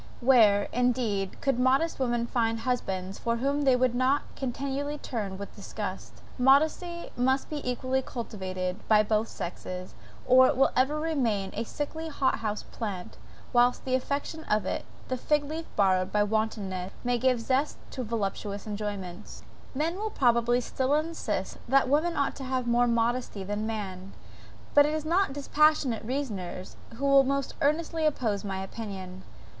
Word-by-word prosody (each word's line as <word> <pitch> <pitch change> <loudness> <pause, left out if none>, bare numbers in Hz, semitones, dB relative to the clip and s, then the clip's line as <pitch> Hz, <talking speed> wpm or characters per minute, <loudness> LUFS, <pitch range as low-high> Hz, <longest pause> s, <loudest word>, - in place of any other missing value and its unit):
Where, 225 -6 +5
indeed, 235 -6 0
could 270 -3 +1
modest 270 +6 +2
women 240 -2 +1
find 230 -1 0
husbands 195 -7 -2
from 235 0 0
whom 280 +4 0
they 265 -2 +6
would 250 -1 +2
not 260 +3 +2
continually 275 +3 -3
turn 210 -9 -4
with 200 +1 -8
disgust? 200 -1 -6 0.2
Modesty 315 +6 +3
must 260 +4 +1
be 295 -1 -3
equally 255 +1 0
cultivated 190 -6 -4
by 215 -1 +6
both 215 +1 +1
sexes, 180 +1 -6 0.3
or 255 0 +7
it 270 - 0
will 270 - +4
ever 275 +4 +2
remain 240 -12 0
a 225 - -2
sickly 315 +6 -4
hot 275 -3 +1
house 210 -1 -3
plant, 200 -6 -6 0.4
whilst 245 0 +3
the 255 -1 +1
affectation 285 +4 -3
of 210 0 +1
it, - - -2 0.2
the 255 - -2
fig 295 +3 +1
leaf 315 +3 -5
borrowed 185 -1 +3
by 210 0 +3
wantonness, 205 -4 -2
may 245 -1 +1
give 255 +1 +3
a - - -6
zest 265 +5 0
to 255 - -4
voluptuous 205 -2 -3
enjoyments.) 205 -2 -6 0.3
Men 325 +6 0
will 435 +2 -2
probably 240 - +3
still 260 +3 0
insist 300 - -2
that 270 +2 +4
woman 310 +5 +2
ought 280 -1 0
to 275 - -6
have 260 -1 -1
more 240 +1 +3
modesty 235 -3 0
than 205 +2 -3
man; 195 -4 -5 0.6
but 290 0 +7
it 305 - -1
is 310 0 -3
not 350 0 +2
dispassionate 285 -3 +2
reasoners 215 -8 -4 0.2
who 275 +4 -3
will 275 0 +6
most 275 0 -1
earnestly 315 +2 +1
oppose 225 -9 -1
my 190 -1 -3
opinion. 190 -3 -7
245 Hz, 160 wpm, -28 LUFS, 210-275 Hz, 0.6 s, or